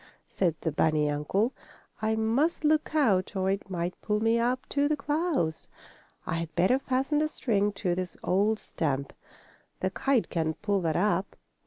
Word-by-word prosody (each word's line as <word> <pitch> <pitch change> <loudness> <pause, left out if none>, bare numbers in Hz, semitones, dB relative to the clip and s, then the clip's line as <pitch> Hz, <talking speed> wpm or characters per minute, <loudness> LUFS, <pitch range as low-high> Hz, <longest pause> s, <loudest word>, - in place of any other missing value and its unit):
said 175 -5 0
the 160 - -1
bunny 155 0 +2
uncle. 195 - 0 0.5
"I 220 0 +1
must 240 +10 +1
look 305 0 +2
out 210 -10 +2
or 190 0 +1
it 195 0 -3
might 175 -1 -3
pull 210 0 0
me 225 +1 +2
up 250 +2 0
to 285 0 +2
the 305 - +1
clouds. 290 - -1 0.6
I 165 - -1
had 165 -1 -6
better 185 +10 +3
fasten 270 +3 0
the 310 - +2
string 210 -8 0
to 185 -3 -1
this 185 0 -4
old 205 +4 +2
stump. 140 -8 -3 0.7
The 185 - -1
kite 265 +3 +1
can't 160 -2 -1
pull 200 -2 +1
that 160 -3 0
up." 190 0 +1
205 Hz, 170 wpm, -28 LUFS, 175-255 Hz, 0.7 s, better